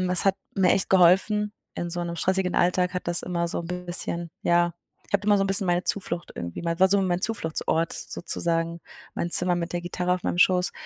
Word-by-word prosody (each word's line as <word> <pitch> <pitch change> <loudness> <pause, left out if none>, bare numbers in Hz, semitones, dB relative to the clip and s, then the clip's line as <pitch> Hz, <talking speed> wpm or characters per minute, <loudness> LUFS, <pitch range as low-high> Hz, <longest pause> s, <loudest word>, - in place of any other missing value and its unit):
Ähm, 185 0 -1
es 180 - +2
hat 195 -1 +3 0.2
mir 185 -2 +3
echt 195 - 0
geholfen. 195 +3 +4 0.2
In 175 - -4
so 175 0 -3
'nem 170 0 -5
stressigen 185 +1 0
Alltag 180 0 +2
hat 180 - -3
das 175 0 +1
immer 170 -1 -2
so - - -3
'n 170 - -7 0.2
bisschen, 170 -1 -1
ja 175 0 +2 0.3
ich - - -17
habe 200 - +4
da - - -8
immer 205 -1 +5
so 195 - +2
'n - - -2
bisschen 195 0 +2
meine 175 0 +1
Zuflucht 175 -3 -2
irgendwie 85 - -6
war 170 +3 +3
so 200 +1 +3
mein 180 -1 -1
Zufluchtsort 165 -6 -1
sozusagen, 170 -1 -3 0.3
mein 170 - -3
Zimmer 180 +1 +4
mit 170 -1 -4
der 175 - -1
Gitarre 180 +1 -2
auf 180 - -6
meinem - - -1
Schoß. 180 -2 +3
175 Hz, 225 wpm, -25 LUFS, 170-190 Hz, 0.3 s, immer